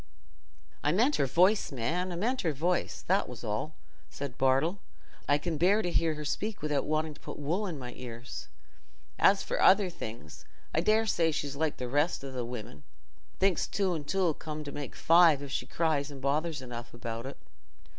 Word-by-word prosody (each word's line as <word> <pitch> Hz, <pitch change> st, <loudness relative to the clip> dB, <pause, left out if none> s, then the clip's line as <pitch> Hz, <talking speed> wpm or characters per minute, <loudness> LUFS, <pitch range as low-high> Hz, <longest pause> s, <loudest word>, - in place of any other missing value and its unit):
"I 145 Hz, -, +3 dB
meant 240 Hz, -, +3 dB
her 135 Hz, -, +2 dB
voice, 185 Hz, +9 st, +3 dB
man—I 170 Hz, +9 st, -1 dB
meant 240 Hz, +9 st, 0 dB
her 160 Hz, -3 st, 0 dB
voice, 170 Hz, +6 st, -1 dB
that 195 Hz, +3 st, +1 dB
was 125 Hz, -2 st, -9 dB
all," 115 Hz, +8 st, -3 dB, 0.3 s
said 140 Hz, -3 st, -6 dB
Bartle. 135 Hz, +8 st, +2 dB, 0.5 s
"I 145 Hz, -, +5 dB
can 160 Hz, +1 st, -3 dB
bear 200 Hz, +5 st, +4 dB
to 175 Hz, -, -1 dB
hear 165 Hz, -2 st, +2 dB
her 150 Hz, 0 st, -6 dB
speak 210 Hz, +6 st, -3 dB
without 150 Hz, -2 st, 0 dB
wanting 155 Hz, 0 st, 0 dB
to -, -, -18 dB
put -, -, -7 dB
wool 170 Hz, +9 st, -1 dB
in 170 Hz, -5 st, -4 dB
my 125 Hz, -2 st, -7 dB
ears. 120 Hz, -1 st, -7 dB, 0.7 s
As 195 Hz, 0 st, +5 dB
for -, -, -2 dB
other 190 Hz, -1 st, +6 dB
things, 95 Hz, -, -8 dB, 0.3 s
I 160 Hz, -, +2 dB
daresay 215 Hz, -4 st, +3 dB
she's 145 Hz, -2 st, -3 dB
like 155 Hz, +1 st, -1 dB
the 125 Hz, -, -4 dB
rest 145 Hz, +3 st, +1 dB
o' 135 Hz, -, -6 dB
the 125 Hz, -2 st, -3 dB
women—thinks 120 Hz, -, -4 dB
two 195 Hz, -3 st, 0 dB
and 150 Hz, -4 st, -5 dB
two 195 Hz, +3 st, +1 dB
'll 165 Hz, -, +2 dB
come 155 Hz, 0 st, -6 dB
to 145 Hz, -, -6 dB
make 145 Hz, -4 st, -6 dB
five, 165 Hz, -4 st, +5 dB
if 140 Hz, -, -7 dB
she 125 Hz, -, -2 dB
cries 155 Hz, -3 st, 0 dB
and 140 Hz, -2 st, -9 dB
bothers 145 Hz, +2 st, -1 dB
enough 120 Hz, -1 st, -8 dB
about 115 Hz, +1 st, -5 dB
it." 135 Hz, -, -8 dB
150 Hz, 190 wpm, -30 LUFS, 135-175 Hz, 0.7 s, other